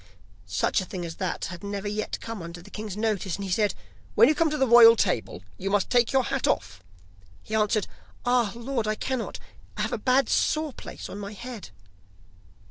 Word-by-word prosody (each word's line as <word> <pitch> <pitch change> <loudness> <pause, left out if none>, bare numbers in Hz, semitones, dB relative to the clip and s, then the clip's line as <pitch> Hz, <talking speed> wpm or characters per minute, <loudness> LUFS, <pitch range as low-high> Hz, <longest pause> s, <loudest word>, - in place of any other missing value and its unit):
Such 90 - +1
a - - -5
thing 180 -2 -5
as 165 -1 -7
that 185 -2 -2
had 175 - -10
never 200 0 -4
yet 210 +1 -3
come 225 -4 -6
under 170 +1 -8
the 175 - -14
king's 210 -2 -6
notice, 210 -5 -1
and 200 - -5
he 190 - -4
said: 210 +2 +2 0.4
'When - - +7
you - - +4
come 320 +1 +2
to 300 - -2
the 265 - +3
royal 230 -1 +9
table 120 - -1 0.2
you 195 - -2
must 200 -1 +1
take 245 -2 +4
your 265 -1 +3
hat 270 +1 -1
off.' 100 -2 -1 0.6
He 215 - -9
answered: 215 -1 +2 0.4
'Ah, 245 -4 +3
Lord, 235 -1 -2
I 215 - +1
cannot; 255 +1 -3 0.4
I - - -1
have - - -2
a - - -1
bad 255 +4 +3
sore 310 -2 +1
place - - -8
on 200 - -7
my 200 +1 -6
head. 235 0 -8
215 Hz, 210 wpm, -26 LUFS, 195-245 Hz, 0.6 s, royal